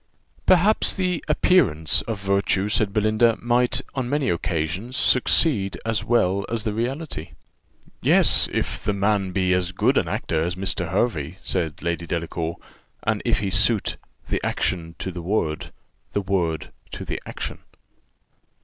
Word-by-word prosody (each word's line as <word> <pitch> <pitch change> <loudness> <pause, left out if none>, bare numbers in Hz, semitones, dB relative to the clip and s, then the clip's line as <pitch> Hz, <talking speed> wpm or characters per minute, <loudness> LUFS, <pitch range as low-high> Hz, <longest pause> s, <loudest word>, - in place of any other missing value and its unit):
"Perhaps 195 +4 +5
the 180 -3 -1
appearance 105 - +3
of 105 0 -5
virtue," 100 0 +1
said 105 -1 +1
Belinda, 110 +2 +2
"might, 120 +1 +2
on 130 -3 -3
many 145 -1 +1
occasions, 85 +8 -2
succeed 125 - +3
as 115 -1 0
well 100 -5 +2
as 115 -2 -2
the 110 -2 -2
reality." 120 - -4 0.7
"Yes, - - +5
if - - -3
the 105 - 0
man 100 -1 +1
be 90 0 +1
as 90 -1 0
good - - +2
an - - -2
actor 80 -1 -1
as 85 +1 -2
Mr. 95 -2 -1
Hervey," 95 - -1
said, 85 -5 -2
Lady 85 0 -2
Delacour, 85 0 -3 0.5
"and - - 0
if - - +1
he 100 -2 -2
suit 105 +3 +2 0.3
'the - - -2
action 85 -2 -2
to 95 - -4
the 90 -1 -6
word' 85 -4 -2 0.4
'the 100 - 0
word 90 -5 -1 0.2
to - - -6
the - - -4
action. - - -5
100 Hz, 150 wpm, -23 LUFS, 85-115 Hz, 0.7 s, Perhaps